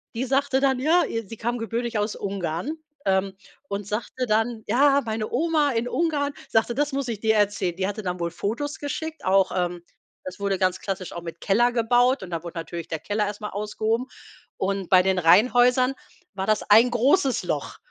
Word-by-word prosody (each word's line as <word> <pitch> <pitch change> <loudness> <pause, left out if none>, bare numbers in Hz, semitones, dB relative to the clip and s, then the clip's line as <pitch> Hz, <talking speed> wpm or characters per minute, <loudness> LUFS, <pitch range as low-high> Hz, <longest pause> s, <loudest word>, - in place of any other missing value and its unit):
die 240 - -1
sagte 270 0 +1
dann: 265 -2 +2
„Ja 325 +6 +4
ihr,“ 225 -2 -4
sie 225 - -8
kam 240 +2 -2
gebürtig 230 0 -2
aus 210 +1 -1
Ungarn, 195 - -3 0.3
ähm, 190 0 +1 0.3
und 200 0 -4
sagte 235 +4 -3
dann: 220 +1 0
„Ja, 280 +5 +4
meine 220 -1 -3
Oma 300 +1 +2
in 230 +2 -1
Ungarn 290 -3 0 0.2
sagte, 225 +2 +2
‚das 295 +2 0
muss 275 -2 -2
ich 220 -3 -3
dir 220 -1 +3
erzählen’.“ 200 -4 0
Die 190 0 0
hatte 205 +1 -4
dann 180 -1 -3
wohl 170 -1 -2
Fotos 240 - -3
geschickt, 320 +2 -5
auch, 190 0 +3
ähm 175 -1 -1 0.4
das 185 +1 -7
wurde 200 -1 0
ganz 185 -1 +1
klassisch 195 -2 -4
auch 170 - -6
mit 165 0 -8
Keller 240 +5 +3
gebaut 245 +2 +2
und 180 - -9
da 165 -1 -3
wurde 170 0 -8
natürlich 165 0 -6
der 160 - -3
Keller 210 0 -1
erst 205 0 -5
mal 210 - -5
ausgehoben 215 +4 -2 0.5
und 195 -1 -2
bei 185 -1 +7
den 190 -1 +1
Rheinhäusern 245 +8 +4 0.4
war 190 0 -2
das 215 0 +2
ein 230 +4 +7
großes 265 +3 +2
Loch. - - -3
220 Hz, 200 wpm, -24 LUFS, 190-255 Hz, 0.5 s, bei